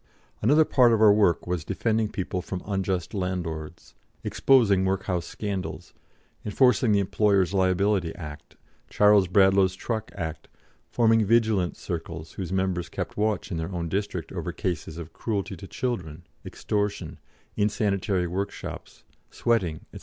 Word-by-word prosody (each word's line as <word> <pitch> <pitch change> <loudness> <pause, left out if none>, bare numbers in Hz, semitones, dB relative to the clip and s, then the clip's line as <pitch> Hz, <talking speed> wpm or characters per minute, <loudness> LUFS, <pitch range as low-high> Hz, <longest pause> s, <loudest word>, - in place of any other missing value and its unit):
Another 150 +8 +5
part 125 -5 +4
of 110 - +2
our 110 -2 +7
work 100 -5 +2
was 90 -3 -2
defending 110 +4 0
people 95 -2 -3
from 90 0 -6
unjust 95 -3 -2
landlords, 85 -5 -4 0.3
exposing 110 -8 +3
workhouse 95 -4 -1
scandals, 100 -3 -5 0.5
enforcing 120 +1 +3
the 105 - +4
Employers' 100 -2 +2
Liability 95 -1 +2
Act, 75 -3 -10 0.3
Charles 105 -2 +5
Bradlaugh's 95 0 +4
Truck 110 +1 -4
Act, 80 -4 -5 0.4
forming 115 -2 +3
"Vigilance 110 -4 +2
Circles" 80 -2 -6
whose 95 -3 -6
members 95 -2 -1
kept - - -5
watch 105 -1 -1
in 85 - -2
their 80 +3 -4
own 85 -2 -3
district 95 -3 -3
over - - -4
cases 85 -3 -4
of 85 -1 -8
cruelty 100 -3 -3
to 95 +3 -10
children, 90 -11 -4 0.2
extortion, 105 -1 -3 0.4
insanitary 100 -3 0
workshops, 95 +3 -6 0.3
sweating, 90 -10 0
&c. - - -8
95 Hz, 135 wpm, -26 LUFS, 90-105 Hz, 0.5 s, our